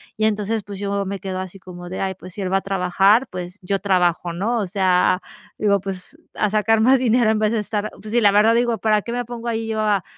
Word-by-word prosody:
y 215 - 0
entonces, 215 +1 0
pues, 200 0 -8
yo 200 0 -2
me 200 +1 -3
quedo 185 -1 -4
así 185 0 -7
como 175 -1 -10
de: 185 - -5
"Ay, 190 0 -1
pues 185 0 -12
si 205 - -6
él 185 -1 -2
va - - +5
a - - -2
trabajar, 195 +5 +3
pues 180 +1 -6
yo 195 +2 -1
trabajo", 180 -3 +1
¿no? 220 +8 -1
O 205 - -2
sea, 185 -1 +2 0.4
digo: 200 -2 +2
"Pues, 195 - -7 0.2
a 210 - 0
sacar 220 +1 +2
más 260 +3 +5
dinero 235 -2 +3
en 215 - 0
vez 215 0 +2
de 230 - 0
estar" 210 0 -3
pues 215 - -8
sí, 240 +1 +2
la 205 - +6
verdad, 210 +3 +5
digo: 235 -1 +1
"¿Para 215 0 +2
qué 235 - -6
me 245 0 -2
pongo 240 0 -7
ahí 225 -1 -2
yo 220 -1 -2
a 205 -3 +1
205 Hz, 260 wpm, -21 LUFS, 190-220 Hz, 0.4 s, la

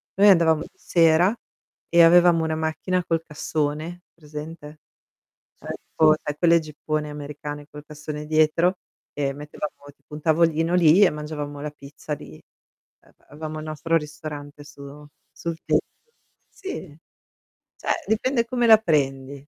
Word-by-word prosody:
noi 205 +2 +6
andavamo 165 -4 +5
di - - -8
sera 170 +5 +3 0.5
e 170 0 +6
avevamo 170 0 +6
una 160 0 -1
macchina 160 +3 -1
col 165 -1 0
cassone, 155 +3 -3
presente? 150 -1 -10 0.8
Cioè - - -9
tipo 155 -1 +2
sai 150 0 -4
quelle 170 0 +4
jeeppone 155 0 -4
americane 145 0 -7
col 150 - -10
cassone 150 0 -7
dietro 155 +4 +2 0.4
e 140 -2 -1
mettevamo 150 +1 -7 0.2
tipo - - -27
un 150 - -7
tavolino 165 +1 +2
lì 175 +2 +6
e 195 - +8
mangiavamo 150 -1 -6
la 150 - -4
pizza 145 +1 -9
lì. 80 - -12 0.7
Ehm, - - -24 0.2
avevamo 155 +1 -7
il - - -8
nostro 155 +2 -1
ristorante 150 -1 -6
su 145 0 -12 0.3
sul 170 -1 -5
tetto. 465 - -2 0.4
Sì, 190 - -8 0.8
cioè 335 - -2
dipende 235 +2 +1
come 240 -1 0
la 220 -1 +9
prendi. 140 -6 -1
155 Hz, 140 wpm, -24 LUFS, 150-170 Hz, 0.8 s, la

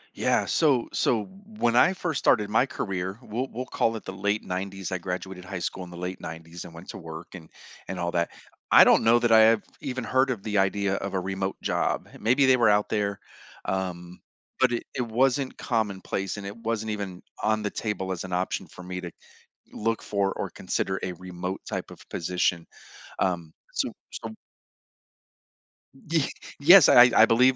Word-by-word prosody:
Yeah, - - +2
so 140 -7 +2
so 115 -4 +2 0.3
when 120 - +2
I 185 +9 +6
first 175 -5 -2
started 105 -3 +3
my 110 +5 +2
career, 95 -4 -3
we'll 120 +4 -3
we'll 125 +3 -4
call 115 -2 0
it 110 - -7
the 95 - -5
late 100 +3 -1
'90s, 95 0 -4
I 95 - -1
graduated 90 +1 -5
high 95 +1 -6
school 95 - -4
in 90 - -10
the 90 - -10
late 90 +1 -5
'90s 80 +1 -8
and 85 - -11
went 85 +3 -12
to - - -7
work 80 0 -9
and 85 -4 -11 0.4
and 95 - -5
all 85 0 -1
that. 85 -1 0 0.4
I - - +10
don't - - +5
know 115 +1 +6
that 120 -1 +1
I 110 - +8
have 110 0 +5 0.2
even 130 -3 -4
heard 130 +1 +2
of 115 -6 -3
the 105 -2 0
idea 100 0 +1
of 100 0 -4
a - - +2
remote 95 +1 -3
job. - - 0
Maybe 125 +6 +3
they 130 -1 +5
were 115 -3 +4
out 105 0 +3
there, 100 -2 -1 0.5
um, 90 -2 -3 0.4
but 130 -1 +4
it 120 - -1
it 130 - -1
wasn't 130 +3 +1
commonplace 100 -4 -2
and 100 - -7
it 100 +3 -7
wasn't 115 -1 -2
even 100 -4 -5 0.2
on 110 0 +1
the 105 - -2
table 100 -4 -3
as 90 - -3
an 95 -1 -6
option 90 +1 -1
for 90 - -12
me 90 0 -5
to 90 -1 -6 0.6
look 115 +1 -1
for 100 -1 0
or - - -3
consider 95 0 -2
a 95 - -2
remote 90 +1 -6
type - - -4
of - - -11
position. 85 0 -1 0.5
Um, 85 -4 -1 0.2
so - - -1 0.2
so 110 -1 -7 1.8
Y 160 -4 +2 0.3
yes, 175 +6 +9
I 125 0 +8
I 110 - +8
believe, 125 +3 +4
100 Hz, 190 wpm, -26 LUFS, 90-115 Hz, 1.8 s, I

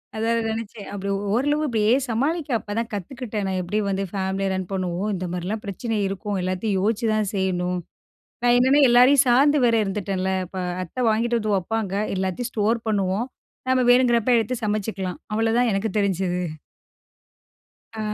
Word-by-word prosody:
அதான் 225 +1 0
அது 230 - 0
நெனைச்சேன். 220 -1 -6
அப்படி 200 0 -4 0.2
ஓரளவு 290 +6 +1
இப்படியே 220 -3 +2 0.2
சமாளிக்க, 290 +7 -1
அப்பதான் 225 +3 -3
கத்துக்கிட்டேன். 210 +1 -4
நான் 190 -1 -1
எப்படி 180 +4 -1
வந்து 195 0 -1
ஃபேமிலிய 195 0 -1
ரன் 190 -1 -3
பண்ணுவோம். 185 +2 -2
இந்த 185 0 -4
மாரியெல்லாம் 185 +5 -3
பிரச்சனை 215 +3 -3
இருக்கும். 195 +1 -3
எல்லாத்தையும் 185 +2 -1
யோசிச்சுதான் 215 0 +1
செய்யணும். 180 -1 0 0.7
நான் 240 - +5
என்னான்னா? 265 +4 +4
எல்லாரையும் 250 +3 +6
சார்ந்து 280 +5 +5
வேற 235 -1 +4
இருந்துட்டேன்ல! 195 -1 -2 0.2
இப்ப 190 +2 -8 0.3
அத்த 170 - -18
வாங்கிட்டு 235 +2 +1
வந்து 215 -2 0
வப்பாங்க, 200 +1 -2 0.2
எல்லாத்தையும் 190 +6 -2
ஸ்டோர் 220 +2 +1
பண்ணுவோம். 200 +3 0 0.4
நம்ம 260 0 +3
வேணுங்கறப்ப 245 -1 +4
எடுத்து 225 +2 -1
சமச்சிக்கலாம். 205 -3 -2
அவ்ளதான் 225 +2 +2
எனக்கு 195 +3 0
தெரிஞ்சது. 190 -3 0 1.6
ஆ. - - -4
215 Hz, 145 wpm, -23 LUFS, 190-235 Hz, 1.6 s, எல்லாரையும்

